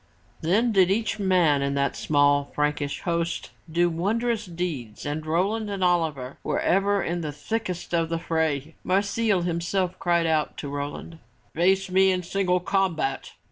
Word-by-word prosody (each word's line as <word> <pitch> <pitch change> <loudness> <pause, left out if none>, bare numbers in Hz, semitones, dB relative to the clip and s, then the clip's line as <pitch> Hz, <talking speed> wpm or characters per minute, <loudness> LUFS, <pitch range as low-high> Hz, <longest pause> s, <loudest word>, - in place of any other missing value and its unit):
Then 210 +9 +2
did 190 -3 +4
each 220 +2 0
man 180 -7 +3
in 140 0 -1
that 140 0 0
small 145 -1 +2
Frankish 150 -1 -1
host 170 0 -2 0.2
do 175 +2 +3
wondrous 210 +6 -1
deeds 165 -11 -5
and 150 +2 -3
Roland 195 +7 0
and 195 -2 -2
Oliver 160 -7 0
were - - -1
ever 200 +1 +2
in 175 +1 -2
the 155 -2 -3
thickest 180 +4 -4
of 165 -1 +1
the 165 - -1
fray. 160 -2 -1
Marsile 200 0 +1
himself 175 +2 -1
cried 170 -1 +2
out 155 -2 0
to 145 - -5
Roland, 145 +3 -5 0.3
"Face 190 +3 +2
me 190 +1 +5
in 180 -1 -1
single 180 0 +1
combat!" 180 -6 -1
175 Hz, 155 wpm, -25 LUFS, 155-190 Hz, 0.3 s, me